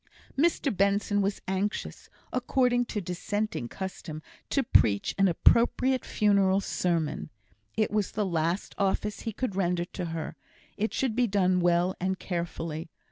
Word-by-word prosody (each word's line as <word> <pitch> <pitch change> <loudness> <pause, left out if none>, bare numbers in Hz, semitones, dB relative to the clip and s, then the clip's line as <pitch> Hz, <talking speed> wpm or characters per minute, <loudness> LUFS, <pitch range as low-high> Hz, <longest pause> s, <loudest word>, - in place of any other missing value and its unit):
Mr 285 -4 +2
Benson 200 +1 +2
was 200 0 -1
anxious, 190 +2 -3 0.2
according 250 -1 +2
to 210 -3 -3
Dissenting 205 - -2
custom, 175 -5 -6 0.3
to 275 - +2
preach 105 - +3
an 195 - +6
appropriate 245 +8 +3
funeral 200 -2 +3
sermon. 170 -5 -1 0.5
It 215 - +2
was 210 -2 0
the 210 -1 0
last 170 +1 -1
office 205 +1 0
he 225 - -4
could 215 -2 -3
render 175 -2 +1
to 180 - -5
her; 165 -1 -4 0.4
it 220 +2 -1
should 255 -5 -1
be 245 0 +3
done 185 -3 +2
well 175 +1 +2
and 190 +1 -1
carefully. 165 -3 -4
195 Hz, 140 wpm, -28 LUFS, 175-215 Hz, 0.5 s, an